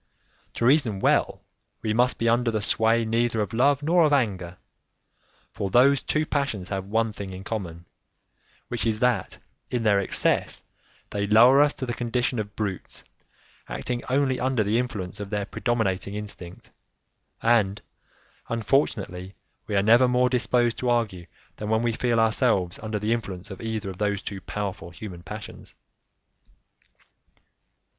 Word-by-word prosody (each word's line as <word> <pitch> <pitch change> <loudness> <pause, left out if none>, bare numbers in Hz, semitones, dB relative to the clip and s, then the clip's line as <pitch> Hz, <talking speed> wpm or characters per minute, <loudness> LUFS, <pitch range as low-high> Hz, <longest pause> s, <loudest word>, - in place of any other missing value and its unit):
To 115 - 0
reason 125 -7 +3
well, - - +1 0.4
we 110 - 0
must 125 +3 +2
be 115 - 0
under 120 +1 +3
the 110 -1 0
sway 115 +2 +2
neither 115 0 0
of 105 -1 -2
love 140 +4 +3
nor 170 +3 +4
of 155 - +3
anger, 95 -10 0 0.9
for 100 - -3
those 130 +6 +5
two 155 0 0
passions 140 -12 -2
have 95 -1 -3
one 110 +2 0
thing 100 -1 -7
in 95 0 -8
common 90 -6 -5 0.8
which 120 -1 -2
is 110 -1 +1
that, 125 +1 0 0.3
in 120 -2 -1
their 105 -2 +4
excess, 100 - +1 0.5
they 100 0 -1
lower 120 +6 +7
us 145 0 +3
to 130 - -4
the 120 - -3
condition 120 0 -1
of 105 -1 -5
brutes 100 -4 -4 0.7
acting 120 -1 -3
only 130 -1 +1
under 130 -3 +1
the 105 +3 +1
influence 105 -6 -4
of 100 -1 -6
their 105 -1 -2
predominating 105 -4 -1
instinct, 100 -4 -8 0.7
and, 110 -4 +3 0.7
unfortunately, 100 -6 -1 0.3
we 105 - -2
are 100 - +3
never 120 +4 +6
more 125 0 +3
disposed 120 -1 +1
to 125 - 0
argue 105 -8 0 0.3
than 105 - -5
when 110 +1 +2
we 120 - +2
feel 115 0 0
ourselves 100 -5 +2
under 110 -1 -3
the 105 +2 0
influence 100 -4 -5
of 95 - -8
either 110 -3 -3
of 90 - -12
those 100 -1 -1
two 100 -2 -6
powerful 100 -4 -5
human 90 0 -9
passions. 105 +4 -9
110 Hz, 155 wpm, -25 LUFS, 100-120 Hz, 0.9 s, lower